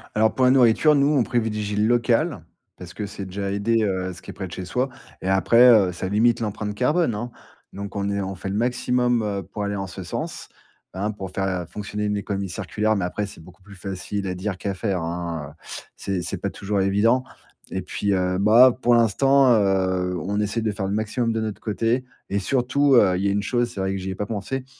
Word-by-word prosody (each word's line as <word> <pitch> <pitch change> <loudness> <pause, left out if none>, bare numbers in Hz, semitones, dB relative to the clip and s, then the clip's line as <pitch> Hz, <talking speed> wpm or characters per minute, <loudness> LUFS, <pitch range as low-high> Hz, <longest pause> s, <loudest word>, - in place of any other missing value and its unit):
Alors 110 +1 +3
pour 130 - +2
la 125 - +6
nourriture, 130 +4 +5
nous, 140 0 +3
on 130 - +4
privilégie 105 -4 -1
le 105 +1 +2
local, 120 0 +1 0.3
parce 90 0 -10
que 105 - -4
c'est 100 -1 -7
déjà 100 +1 -4
aider, 110 +3 +1
heu, 95 -2 -1
ce 90 - -13
qui - - -8
est - - -11
près 95 - -6
de - - -14
chez 90 +2 -6
soi 125 +9 -1 0.3
et 95 - -2
après, 115 +6 +5
heu, 105 -6 +5
ça 90 +1 -4
limite 110 +4 +3
l'empreinte 105 -2 -3
carbone, 150 +4 +1
hein. 120 +4 -5 0.4
Donc 100 +1 -7
on 100 0 -1
est 100 - -1
on 95 0 -3
fait 95 +1 -6
le 100 - -3
maximum, 125 +1 +1
heu, 100 -2 -2
pour 105 +4 -6
aller 100 0 -2
en 95 -1 -3
ce 95 +1 -8
sens, 90 - -5 0.5
hein. 105 +3 -1
Pour 95 -2 -7
faire 95 -2 -2
fonctionner 105 +2 -4
une 105 0 0
économie 100 -1 -3
circulaire, 105 +3 -1
mais 95 - -1
après, 100 +3 -3
c'est 95 - -12
beaucoup 90 +3 -16
plus 100 +1 -14
facile 95 +1 -5
à 90 - -2
dire 95 +1 -4
qu'à 100 0 -3
faire, 95 -2 -2
hein, 85 -3 -4
heu, - - -18 0.4
c'est 95 -2 -3
c'est - - -4
pas - - -3
toujours 100 0 -2
évident. 105 +6 +3 0.5
Et 95 - -2
puis 100 +2 -1
heu, 90 0 0
bah, 115 +5 +6
pour 120 0 +4
l'instant, 135 +4 +4
heu, 95 -3 +1
on 100 +6 -2
essaie 105 +2 -1
de 110 - 0
faire 100 -1 -3
le 100 - -2
maximum 110 +2 -1
de 115 - -1
notre 110 -2 -4
côté 115 +4 0 0.3
et 100 - 0
surtout, 135 +5 +2
heu, 95 -6 +5
il 95 - -2
y - - +2
a - - +2
une 100 0 0
chose- 120 +1 0
c'est - - -7
vrai 95 0 0
que 95 - -3
j'y 95 +1 -5
ai - - -5
pas 105 - -3
pensé- 115 +5 -4
100 Hz, 235 wpm, -23 LUFS, 95-115 Hz, 0.5 s, la